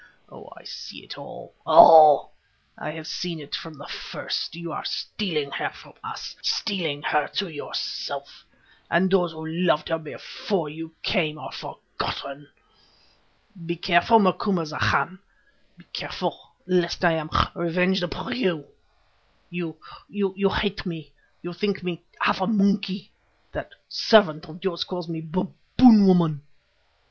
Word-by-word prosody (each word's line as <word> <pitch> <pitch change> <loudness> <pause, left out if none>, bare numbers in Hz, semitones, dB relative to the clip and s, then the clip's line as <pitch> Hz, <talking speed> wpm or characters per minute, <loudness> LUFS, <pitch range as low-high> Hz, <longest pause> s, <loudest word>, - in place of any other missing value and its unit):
Oh, - - -13
I - - -14
see - - -9
it - - -9
all—all; 155 -3 +6 0.4
I - - -6
have 155 0 -7
seen 170 0 -4
it 145 -1 -11
from 165 -2 -5
the 140 - -11
first; - - -4
you 170 -1 -6
are - - -5
stealing 155 -9 -3
her - - -2
from - - -16
us, - - -7
stealing 165 -9 -1
her 150 -1 +1
to 200 - 0
yourself, 150 -3 -5 0.5
and 180 +2 +2
those 180 -3 +3
who 160 0 -8
loved 165 -1 0
her 165 0 0
before 160 +2 -4
you 160 +1 -9
came 155 -7 0
are - - -8
forgotten. 140 +1 -6 1.2
Be 170 - -1
careful, 175 +6 +4
Macumazahn, 185 -2 +1 0.6
be - - -20
careful, - - -4 0.2
lest 180 -1 +1
I 170 - +6
am 160 -1 -2 0.2
revenged 180 +2 +1
upon 175 +1 -4
you. 175 - 0 0.9
You, 170 -3 -5 0.3
you 195 -1 0
hate 200 0 -1
me; 160 -6 -7 0.3
you 175 0 -5
think 200 +1 -2
me 175 -2 -4 0.2
half - - +2
a 185 - +1
monkey; 200 -2 +1 0.4
that - - -7
servant 180 -7 +3
of 175 +4 -12
yours 180 -3 -1
calls 180 -2 -6
me 165 -1 -5
Baboon 195 +6 +5
woman. 170 -6 +4
175 Hz, 135 wpm, -24 LUFS, 160-190 Hz, 1.2 s, all—all